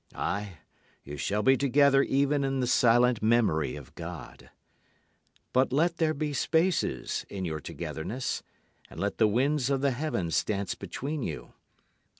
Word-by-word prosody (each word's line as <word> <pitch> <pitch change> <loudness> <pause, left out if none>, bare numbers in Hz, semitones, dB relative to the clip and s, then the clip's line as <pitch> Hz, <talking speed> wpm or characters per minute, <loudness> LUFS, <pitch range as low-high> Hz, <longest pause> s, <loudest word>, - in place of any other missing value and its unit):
Aye, 100 -3 -3 0.5
you 70 - -8
shall 105 +8 -1
be 135 0 +5
together 140 +1 +4
even 140 +1 +1
in 135 0 -1
the 125 - +1
silent 120 -1 +4
memory 110 - +2
of 70 -4 -11
God. - - -9 1.0
But 130 +1 +3
let 165 +5 +1
there 155 -1 +1
be 150 0 -2
spaces 160 - 0
in 95 -2 -4
your 80 -2 -3
togetherness, 80 - -4 0.5
And - - -10
let - - -2
the 110 - +5
winds 130 +5 +1
of 135 -1 +1
the 140 -1 +2
heavens 120 - -1
dance 100 -2 -2
between 145 +2 -5
you. - - -6
125 Hz, 150 wpm, -28 LUFS, 100-140 Hz, 1.0 s, be